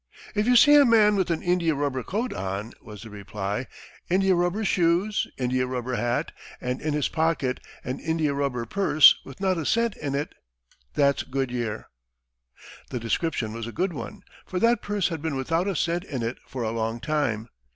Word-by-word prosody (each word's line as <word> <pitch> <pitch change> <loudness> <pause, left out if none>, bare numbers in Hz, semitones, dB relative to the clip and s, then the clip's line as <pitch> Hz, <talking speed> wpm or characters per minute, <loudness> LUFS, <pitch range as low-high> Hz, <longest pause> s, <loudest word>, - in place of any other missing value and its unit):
"If 210 +1 0
you 250 - +5
see 290 +5 +8
a 290 -1 +8
man 220 -4 +5
with 190 -2 0
an 165 -2 -1
India 175 -3 +2
rubber 140 -2 -1
coat 220 - -2
on," 100 +4 -4
was 105 -2 -11
the 110 - -10
reply, 105 +3 -4 0.4
"India 190 +1 +3
rubber 175 +5 0
shoes, 180 +4 +2
India 125 0 0
rubber 125 0 -3
hat, 120 -1 -1 0.3
and 125 +1 -3
in 155 -1 -1
his 150 - +1
pocket 160 -5 0 0.2
an 130 +1 -4
India 160 -3 0
rubber 140 -4 -1
purse 155 - +6
with 135 - -12
not 190 -3 +1
a 160 - -3
cent 230 -1 +1
in 140 -2 -3
it, 145 +2 -3 0.6
that's 140 -1 +3
Goodyear." 125 -5 -3 1.0
The 125 - -3
description 115 -1 -1
was 115 0 -5
a - - -5
good 180 +7 -1
one, 200 +7 -7 0.2
for 185 - -4
that 235 +3 +3
purse 205 -3 0
had 165 -3 -4
been 160 -3 -2
without 165 +7 0
a 195 - -1
cent 170 +3 0
in 130 -9 -4
it 115 +2 -3
for 130 -3 -4
a 110 - -1
long 115 0 -2
time. 120 -7 -1
145 Hz, 190 wpm, -25 LUFS, 125-185 Hz, 1.0 s, see